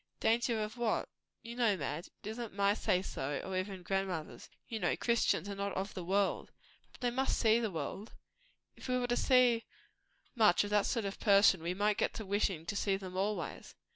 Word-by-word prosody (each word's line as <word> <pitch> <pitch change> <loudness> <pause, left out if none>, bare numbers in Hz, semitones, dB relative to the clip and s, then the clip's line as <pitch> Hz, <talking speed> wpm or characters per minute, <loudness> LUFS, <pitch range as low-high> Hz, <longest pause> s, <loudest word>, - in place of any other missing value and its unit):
"Danger 230 0 +2
of 215 +3 -6
what?" 235 -2 0 0.4
"You 235 +1 -7
know, 230 -5 +2
Madge, 150 +2 -4
it - - -7
is 220 +2 -6
not 230 -5 -6
my 200 0 +3
say 185 -3 +1
so, 140 -5 -3
nor 190 - -4
even 185 0 -3
grandmother's. 190 -4 -3 0.2
You 225 -2 -4
know, - - +1
Christians 230 -6 +1
are 200 - -4
not 200 0 -3
of 195 +2 -3
the 185 - -5
world." 195 +2 0 0.4
"But - - -18
they 245 -1 +1
must 265 +2 0
see 225 0 +4
the 225 -2 -1
world." 195 +4 -5 0.6
"If - - -10
we 250 0 +1
were 250 - 0
to 245 0 0
see 245 -3 +4 0.7
much 215 -7 +4
of 205 - -5
that 210 -1 +3
sort 230 -4 -1
of 195 - -5
person, 200 -4 +5
we 175 +2 -2
might 205 +1 +1
get - - 0
to 220 - -5
wishing 195 -4 0
to 205 - -3
see 195 -1 +1
them 185 -2 -8
always." 195 -2 -3
205 Hz, 210 wpm, -33 LUFS, 190-230 Hz, 0.7 s, person